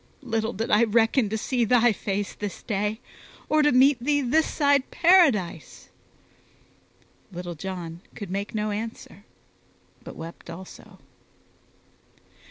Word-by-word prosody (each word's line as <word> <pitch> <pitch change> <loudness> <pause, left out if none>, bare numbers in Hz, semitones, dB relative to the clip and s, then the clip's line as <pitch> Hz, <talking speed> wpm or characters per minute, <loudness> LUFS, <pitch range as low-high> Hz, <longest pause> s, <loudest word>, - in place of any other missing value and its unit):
Little 225 -2 -2
did 225 +4 -3
I 215 +3 +5
reckon 225 +1 +2
to 220 - -2
see 245 +2 -1
thy 240 +1 +4
face 200 -1 -3
this 205 -2 -7
day, 210 0 -2 0.5
or 310 0 +4
to 295 0 +4
meet 255 -1 +4
thee 290 +1 +2
this 295 +5 +2
side 285 -3 +2
Paradise." 330 - +2 1.4
Little 175 -1 -6
John 170 -1 -7
could 200 -3 -7
make 200 +3 -4
no 210 0 -1
answer, 225 +2 -7 0.8
but - - -10
wept 165 +1 -10
also. 180 +3 -11
220 Hz, 125 wpm, -25 LUFS, 200-260 Hz, 1.4 s, I